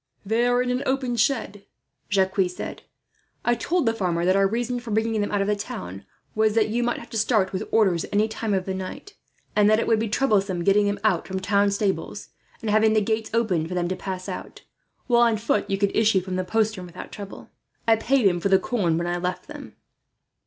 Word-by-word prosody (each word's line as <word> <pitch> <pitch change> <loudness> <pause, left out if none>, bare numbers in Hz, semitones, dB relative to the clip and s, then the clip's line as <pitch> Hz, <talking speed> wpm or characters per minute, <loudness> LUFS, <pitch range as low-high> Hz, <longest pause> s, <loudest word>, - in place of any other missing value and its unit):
"They 225 +4 +2
are 245 0 +2
in 250 - -1
an 250 +1 -1
open 260 -2 0
shed," 225 -4 0 0.5
Jacques 190 -1 +2
said. 180 - -7 0.6
"I 240 - +4
told 330 +7 0
the 225 - +2
farmer 175 -5 -1
that 185 +1 +3
our 195 0 +4
reason 240 +3 -2
for 240 -1 -9
bringing 220 0 0
them 205 - -2
out 205 - +1
of 195 - 0
the 210 - +2
town 95 - -7 0.3
was 215 0 +2
that 220 -1 +3
you 235 +3 0
might 240 0 0
have 235 - -11
to 225 - -1
start 215 -4 +1
with 185 - -4
orders, 190 -7 +3
any 210 +1 +2
time 220 -2 -2
in 190 - 0
the 190 - -3
night; 190 - -7 0.4
and 210 0 +5
that 215 - +5
it - - 0
would 225 -1 +2
be 225 0 -1
troublesome 200 -7 +1
getting 205 +2 +4
them 205 0 -1
out 195 -6 +1
from 190 0 -3
town 200 +1 +2
stables, 200 -1 -2 0.3
and 220 -3 -2
having 215 +1 +4
the 220 - +4
gates 220 +1 -1
opened 195 -9 +1
for 180 - -5
them 175 -1 0
to 185 - -1
pass 185 -1 -6
out; - - -7 0.4
while, 240 -2 +3
on 230 -2 +4
foot, 210 -1 0
you 195 - 0
could 200 0 0
issue 215 -3 +3
from 185 0 -5
the 185 - -1
postern 215 -1 -1
without 175 +1 -10
trouble. 200 -1 -9 0.4
I 225 - +6
paid 250 +2 +1
him 175 -3 +3
for 200 - 0
the 190 - +6
corn 190 -5 0
when 170 - -1
I 175 0 -1
left 180 +1 -3
them." - - -10
210 Hz, 230 wpm, -24 LUFS, 190-225 Hz, 0.6 s, I